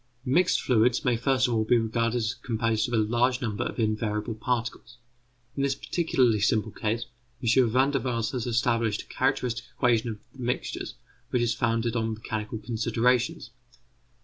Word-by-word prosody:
Mixed 170 Hz, +8 st, +3 dB
fluids 125 Hz, +3 st, +2 dB
may 125 Hz, -2 st, +3 dB
first 130 Hz, +2 st, +2 dB
of 120 Hz, -, -1 dB
all 110 Hz, -1 st, +2 dB
be 120 Hz, +3 st, +3 dB
regarded 115 Hz, +1 st, 0 dB
as 110 Hz, -2 st, 0 dB
composed 115 Hz, -1 st, -1 dB
of 120 Hz, -, -1 dB
a 110 Hz, -, +3 dB
large 120 Hz, +3 st, +1 dB
number 110 Hz, -5 st, -2 dB
of -, -, -5 dB
invariable 110 Hz, 0 st, -1 dB
particles. 120 Hz, +1 st, -3 dB, 0.6 s
In 140 Hz, -, -2 dB
this 140 Hz, -1 st, +1 dB
particularly 130 Hz, -12 st, +1 dB
simple 110 Hz, +1 st, +1 dB
case 115 Hz, +3 st, -2 dB, 0.4 s
M. 120 Hz, +1 st, +4 dB
Van 130 Hz, +4 st, +3 dB
der 140 Hz, -, +1 dB
Waals 115 Hz, -3 st, -1 dB
has 125 Hz, -2 st, -3 dB
established 115 Hz, -2 st, +1 dB
a -, -, -14 dB
characteristic 130 Hz, -3 st, 0 dB
equation 120 Hz, -2 st, +2 dB
of 110 Hz, -, -5 dB, 0.2 s
the 135 Hz, -, -17 dB
mixtures 125 Hz, +1 st, -3 dB, 0.3 s
which 120 Hz, -, +1 dB
is 115 Hz, -1 st, +1 dB
founded 115 Hz, 0 st, 0 dB
on 110 Hz, -1 st, -1 dB
mechanical 110 Hz, 0 st, -4 dB
considerations. 115 Hz, +2 st, 0 dB
115 Hz, 170 wpm, -27 LUFS, 110-125 Hz, 0.6 s, M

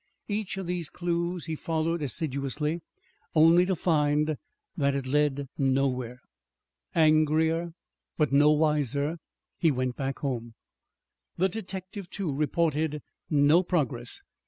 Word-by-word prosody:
Each 205 Hz, -2 st, -2 dB
of 190 Hz, -, -4 dB
these 175 Hz, -3 st, -3 dB
clues 170 Hz, 0 st, -2 dB
he 160 Hz, -, -3 dB
followed 160 Hz, +1 st, -1 dB
assiduously, 145 Hz, +3 st, -2 dB, 0.5 s
only 165 Hz, +3 st, +6 dB
to 190 Hz, -, +1 dB
find 150 Hz, -2 st, +2 dB, 0.4 s
that 140 Hz, -5 st, +1 dB
it 135 Hz, -1 st, -2 dB
led 140 Hz, 0 st, +1 dB
nowhere. 130 Hz, -2 st, 0 dB, 0.7 s
Angrier, 160 Hz, +1 st, +3 dB, 0.4 s
but 150 Hz, -3 st, +2 dB
no 145 Hz, +2 st, +6 dB
wiser, 150 Hz, 0 st, +1 dB, 0.4 s
he 165 Hz, -, +4 dB
went 130 Hz, -3 st, -1 dB
back 135 Hz, 0 st, -3 dB
home. 120 Hz, -5 st, -4 dB, 0.8 s
The 190 Hz, +2 st, +2 dB
detective, 190 Hz, -1 st, -6 dB
too, 185 Hz, -8 st, -3 dB
reported 150 Hz, 0 st, 0 dB, 0.3 s
no 150 Hz, +3 st, +5 dB
progress. 140 Hz, -9 st, -2 dB
155 Hz, 115 wpm, -28 LUFS, 140-170 Hz, 0.8 s, only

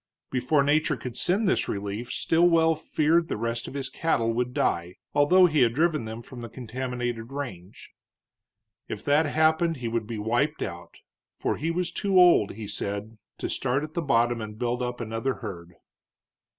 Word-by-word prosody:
Before 135 Hz, +3 st, +2 dB
nature 150 Hz, 0 st, +2 dB
could 125 Hz, -2 st, -7 dB
send 195 Hz, -, +2 dB
this -, -, +1 dB
relief 100 Hz, +4 st, -4 dB
Stilwell 165 Hz, -1 st, +3 dB
feared 160 Hz, +2 st, +1 dB
the -, -, -3 dB
rest 115 Hz, +1 st, -3 dB
of -, -, -8 dB
his 135 Hz, -2 st, -2 dB
cattle 115 Hz, -9 st, 0 dB
would 125 Hz, +1 st, -1 dB
die, 85 Hz, -6 st, -1 dB, 0.2 s
although 180 Hz, +6 st, +6 dB
he 155 Hz, -4 st, +2 dB
had 115 Hz, -2 st, +4 dB
driven 155 Hz, -4 st, +1 dB
them 110 Hz, +1 st, -7 dB
from 125 Hz, -1 st, -10 dB
the 115 Hz, -, -7 dB
contaminated 120 Hz, 0 st, -4 dB
range. 105 Hz, -10 st, -7 dB, 1.0 s
If -, -, -6 dB
that 150 Hz, +2 st, +3 dB
happened 160 Hz, +2 st, +2 dB
he 125 Hz, -2 st, -4 dB
would 115 Hz, -2 st, -2 dB
be 115 Hz, -1 st, -4 dB
wiped 120 Hz, +9 st, 0 dB
out, 85 Hz, 0 st, -7 dB, 0.4 s
for -, -, -1 dB
he 160 Hz, -, -2 dB
was 175 Hz, +1 st, -1 dB
too 195 Hz, -2 st, +2 dB
old, 175 Hz, -, +5 dB
he 110 Hz, 0 st, -7 dB
said, 100 Hz, +2 st, -5 dB, 0.2 s
to -, -, -3 dB
start 130 Hz, +4 st, -1 dB
at 155 Hz, 0 st, -7 dB
the 170 Hz, -, -1 dB
bottom 120 Hz, -5 st, +2 dB
and 105 Hz, 0 st, -7 dB
build 120 Hz, +1 st, -1 dB
up 125 Hz, 0 st, -3 dB
another 115 Hz, +4 st, -2 dB
herd. 90 Hz, -7 st, -8 dB
125 Hz, 175 wpm, -26 LUFS, 115-155 Hz, 1.0 s, although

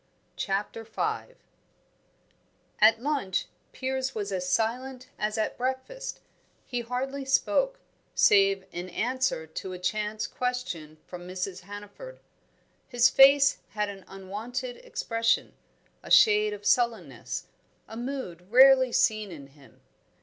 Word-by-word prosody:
CHAPTER 205 Hz, +3 st, -2 dB
V 435 Hz, -, -3 dB, 1.5 s
At 220 Hz, +1 st, +6 dB
lunch 270 Hz, -11 st, -1 dB, 0.3 s
Piers 265 Hz, 0 st, -3 dB
was 205 Hz, -2 st, -3 dB
as 180 Hz, -1 st, -2 dB
silent 255 Hz, +4 st, -1 dB
as 210 Hz, +1 st, -1 dB
at 220 Hz, -, -2 dB
breakfast; 260 Hz, -, -4 dB, 0.4 s
he 245 Hz, -1 st, -3 dB
hardly 260 Hz, +4 st, -3 dB
spoke, -, -, +1 dB, 0.4 s
save 195 Hz, -1 st, +4 dB
in 175 Hz, +1 st, -6 dB
answer 245 Hz, -3 st, -1 dB
to 170 Hz, +4 st, -7 dB
a -, -, -5 dB
chance 210 Hz, +3 st, -2 dB
question 245 Hz, -12 st, -4 dB
from 175 Hz, -1 st, -9 dB
Mrs. 185 Hz, 0 st, -4 dB
Hannaford. 205 Hz, -, -10 dB, 0.7 s
His 245 Hz, -1 st, +4 dB
face 275 Hz, +1 st, +6 dB
had 210 Hz, -1 st, -1 dB
an 195 Hz, -1 st, -9 dB
unwonted 225 Hz, +7 st, -6 dB
expression, 230 Hz, -, -1 dB, 0.5 s
a -, -, -11 dB
shade 425 Hz, -1 st, +6 dB
of 425 Hz, 0 st, -9 dB
sullenness, 225 Hz, -, 0 dB, 0.4 s
a 220 Hz, -, -10 dB
mood 230 Hz, -8 st, -6 dB
rarely 260 Hz, 0 st, +7 dB
seen 215 Hz, -4 st, +1 dB
in 140 Hz, -4 st, -10 dB
him. 140 Hz, -1 st, -21 dB
225 Hz, 120 wpm, -27 LUFS, 195-265 Hz, 1.5 s, rarely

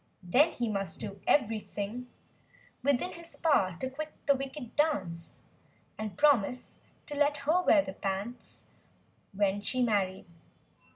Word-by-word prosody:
Then 275 Hz, -, +4 dB
he 240 Hz, -, -1 dB
must 195 Hz, -5 st, -2 dB
do 200 Hz, -2 st, -6 dB
every¬ 225 Hz, -6 st, +3 dB
thing 215 Hz, +5 st, -4 dB, 0.4 s
8o -, -, -23 dB
Within 285 Hz, +7 st, -1 dB
his 335 Hz, 0 st, -11 dB
power 190 Hz, -, +2 dB
to 260 Hz, -, -2 dB
quit 305 Hz, +4 st, -6 dB
the 280 Hz, -, +6 dB
"wicked" 270 Hz, -2 st, -6 dB
dance— 190 Hz, -, -1 dB, 0.5 s
And 215 Hz, -1 st, -5 dB
promise 255 Hz, -5 st, +2 dB, 0.3 s
her 295 Hz, -, -6 dB
to 290 Hz, -, -4 dB
let 290 Hz, 0 st, +3 dB
her 330 Hz, +5 st, +4 dB
wear 305 Hz, -4 st, +5 dB
the 190 Hz, -, -6 dB
pants— 200 Hz, +6 st, -5 dB, 0.7 s
When 200 Hz, 0 st, +1 dB
she 255 Hz, +4 st, 0 dB
married. 195 Hz, -5 st, 0 dB
245 Hz, 150 wpm, -30 LUFS, 200-290 Hz, 0.7 s, the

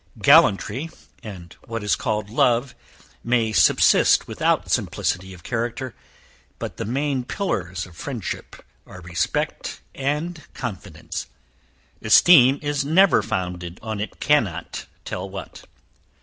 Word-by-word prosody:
Gallantry, 130 Hz, +10 st, +4 dB, 0.3 s
and 90 Hz, -5 st, -10 dB
what 115 Hz, -2 st, -4 dB
is 105 Hz, -, +2 dB
called 105 Hz, -1 st, -3 dB
love, 120 Hz, +2 st, +2 dB, 0.5 s
may 115 Hz, -2 st, +1 dB
subsist -, -, +4 dB
without -, -, 0 dB
simplicity 95 Hz, +1 st, -1 dB
of 90 Hz, -3 st, -13 dB
character; 120 Hz, +2 st, -3 dB, 0.6 s
but -, -, -6 dB
the -, -, -4 dB
main 135 Hz, +3 st, -1 dB
pillars 95 Hz, -, -3 dB
of 90 Hz, -3 st, -15 dB
friendship, 120 Hz, -, -6 dB, 0.2 s
are 95 Hz, -, -11 dB
respect 85 Hz, -2 st, -3 dB
and 150 Hz, +5 st, -2 dB
confidence 105 Hz, -6 st, -6 dB, 0.7 s
esteem 135 Hz, +3 st, +7 dB
is 145 Hz, -1 st, 0 dB
never 180 Hz, +7 st, +4 dB
founded 90 Hz, -4 st, -4 dB
on 110 Hz, -2 st, -4 dB
it 105 Hz, -, -6 dB
cannot 100 Hz, -, 0 dB, 0.2 s
tell 95 Hz, +1 st, -5 dB
what. 95 Hz, 0 st, -9 dB
115 Hz, 115 wpm, -23 LUFS, 95-140 Hz, 0.7 s, esteem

